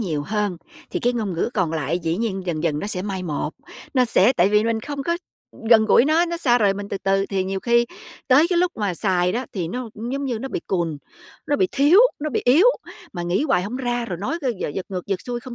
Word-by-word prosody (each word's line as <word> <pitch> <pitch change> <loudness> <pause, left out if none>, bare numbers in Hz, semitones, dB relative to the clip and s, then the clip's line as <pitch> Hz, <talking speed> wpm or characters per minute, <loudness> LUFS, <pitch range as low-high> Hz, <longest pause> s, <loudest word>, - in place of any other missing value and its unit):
nhiều 155 -9 -2
hơn, 205 +1 -2 0.3
thì - - -3
cái 245 - +1
ngôn 220 -5 -2
ngữ 170 +7 -1
còn 180 -6 0
lại 160 +2 -1
dĩ 165 -1 -2
nhiên 200 -3 -2
dần 160 -3 -2
dần 155 -3 0
nó 200 - -4
sẽ 185 -3 -3
mai 195 -2 -4
một, 155 -3 -3 0.4
nó 255 - +4
sẽ 230 0 +4
tại 185 -5 +3
vì 210 +1 +3
mình 225 -1 0
không 280 +3 -5
có, 340 +5 0 0.3
ừm, - - -17
gần 220 -2 +7
gũi 220 - +5
nó, 315 +4 +3
nó 340 - -3
xa 250 -7 +3
rời 200 -4 +3
mình 200 0 -6
từ 200 - -3
từ, 195 0 +1
thì 190 -2 -1
nhiều 190 0 -3
khi 235 +1 +3 0.4
tới 290 +6 +5
cái 355 -2 +1
lúc 355 0 +2
mà 205 -5 -1
xài 180 -2 +1
đó 250 +5 -2
thì 175 -5 -3
nó 250 +6 -5 0.2
giống 280 +1 -2
như 245 -4 -2
nó 265 +4 -5
bị 170 - -3
cùn, 170 -5 -1 0.5
nó 290 - +1
bị 375 - +2
thiếu, 295 +9 +5 0.2
nó 305 +1 -2
bị 245 - 0
yếu, 290 - +5 0.5
mà 175 - -4
nghĩ 175 +9 0
hoài 275 -12 +2
hổng 215 +7 -4
ra, 245 -2 -2
rồi 180 -6 -5
nói, 270 - -2
ơ, 260 - +1 0.2
giật 190 - -4
ngược 185 -2 -5
giật 195 -2 -2
xuôi 240 -1 -5
không 250 0 -9
210 Hz, 265 wpm, -22 LUFS, 185-255 Hz, 0.5 s, gần